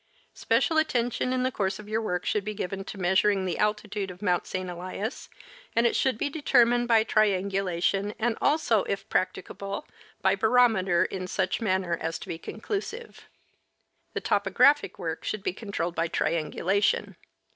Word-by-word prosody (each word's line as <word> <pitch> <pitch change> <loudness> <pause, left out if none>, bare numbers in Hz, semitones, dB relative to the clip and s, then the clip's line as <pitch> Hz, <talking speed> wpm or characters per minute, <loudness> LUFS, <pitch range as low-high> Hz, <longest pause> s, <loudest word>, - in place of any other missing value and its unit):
Special 320 -2 +2
attention 245 -4 0
in 255 0 0
the 260 - +1
course 190 -4 -1
of 210 - -11
your 220 +1 -1
work 180 -5 -2
should 210 - 0
be 215 +1 -4
given 195 +1 -4
to 200 - -7
measuring 190 +2 +2
the 180 - -2
altitude 210 -1 -1
of 180 0 -10
Mount 180 -4 0
St. 185 -1 -3
Elias, 185 +6 -5 0.5
and 230 - +3
it 235 - +2
should 260 -4 +1
be - - -1
determined 245 -5 +3
by 225 -2 +5
triangulation 195 -2 +1
and 235 0 0
also, 260 -9 +3
if 195 0 -3
practicable, 195 +1 -2 0.4
by 190 - +4
barometer 215 -5 +3
in 185 -1 -4
such 185 +3 -1
manner 185 -5 +1
as 160 +1 -2
to - - -10
be 165 - -5
conclusive. 420 - -6 0.9
The - - -3
topographic 290 +1 +3
work 160 -2 -4
should 210 -2 -3
be - - -1
controlled 195 -5 -3
by 165 0 0
triangulation. 170 +5 0
200 Hz, 160 wpm, -27 LUFS, 185-230 Hz, 0.9 s, by